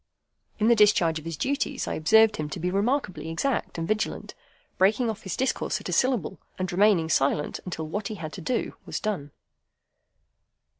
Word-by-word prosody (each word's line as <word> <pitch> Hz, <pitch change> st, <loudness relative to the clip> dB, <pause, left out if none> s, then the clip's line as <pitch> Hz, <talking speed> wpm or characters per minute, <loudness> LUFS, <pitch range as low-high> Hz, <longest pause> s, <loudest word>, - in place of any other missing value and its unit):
In 220 Hz, -, +2 dB
the 235 Hz, -, +6 dB
discharge 195 Hz, -7 st, +4 dB
of 155 Hz, -, -14 dB
his 165 Hz, -2 st, -5 dB
duties, 280 Hz, -, -1 dB
I -, -, -2 dB
observed 220 Hz, +7 st, +4 dB
him 150 Hz, -1 st, -3 dB
to 175 Hz, -, -5 dB
be 180 Hz, +2 st, -1 dB
remarkably 200 Hz, -, -1 dB
exact 235 Hz, +10 st, -1 dB
and 165 Hz, 0 st, -3 dB
vigilant, 215 Hz, 0 st, -2 dB, 0.5 s
breaking 220 Hz, +5 st, +3 dB
off 220 Hz, 0 st, -9 dB
his 190 Hz, -, -5 dB
discourse 260 Hz, -, -1 dB
at -, -, -7 dB
a -, -, -2 dB
syllable, 245 Hz, -8 st, +1 dB, 0.2 s
and 185 Hz, -1 st, -2 dB
remaining 185 Hz, -3 st, +4 dB
silent 145 Hz, -1 st, +1 dB
until 165 Hz, -3 st, -4 dB
what 200 Hz, +7 st, -3 dB
he 215 Hz, -, -5 dB
had 155 Hz, -5 st, -7 dB
to 185 Hz, -, -7 dB
do 245 Hz, +8 st, -1 dB
was -, -, -3 dB
done. 195 Hz, -10 st, -3 dB
195 Hz, 185 wpm, -26 LUFS, 165-220 Hz, 0.5 s, the